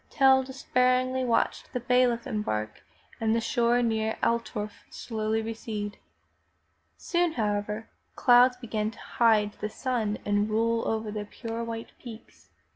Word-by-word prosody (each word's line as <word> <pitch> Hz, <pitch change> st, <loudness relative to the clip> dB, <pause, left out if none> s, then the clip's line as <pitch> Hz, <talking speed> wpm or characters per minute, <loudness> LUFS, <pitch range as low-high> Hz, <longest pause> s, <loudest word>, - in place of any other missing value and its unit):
Tell 265 Hz, -2 st, +5 dB
despairingly 255 Hz, 0 st, +1 dB
watched 235 Hz, -2 st, 0 dB
the 250 Hz, -, -1 dB
bailiff 245 Hz, -1 st, +2 dB
embark 110 Hz, -, -3 dB, 0.4 s
and 225 Hz, 0 st, +1 dB
the -, -, +2 dB
shore 240 Hz, 0 st, +2 dB
near 220 Hz, -1 st, 0 dB
Altdorf 230 Hz, -3 st, -2 dB
slowly 220 Hz, -1 st, -2 dB
recede. 220 Hz, -2 st, -5 dB, 1.0 s
Soon, 345 Hz, -2 st, 0 dB
however, 210 Hz, -1 st, -2 dB, 0.3 s
clouds 250 Hz, 0 st, +5 dB
began 215 Hz, -3 st, -2 dB
to -, -, -13 dB
hide 215 Hz, -3 st, +2 dB
the 210 Hz, -, -3 dB
sun 225 Hz, -3 st, -2 dB
and 205 Hz, +1 st, +1 dB
roll 230 Hz, +1 st, +1 dB
down -, -, 0 dB
over 220 Hz, -1 st, -2 dB
the 210 Hz, -1 st, -4 dB
pure 230 Hz, +2 st, -5 dB
white 230 Hz, 0 st, -6 dB
peaks. 230 Hz, -3 st, -12 dB
225 Hz, 135 wpm, -27 LUFS, 215-250 Hz, 1.0 s, Tell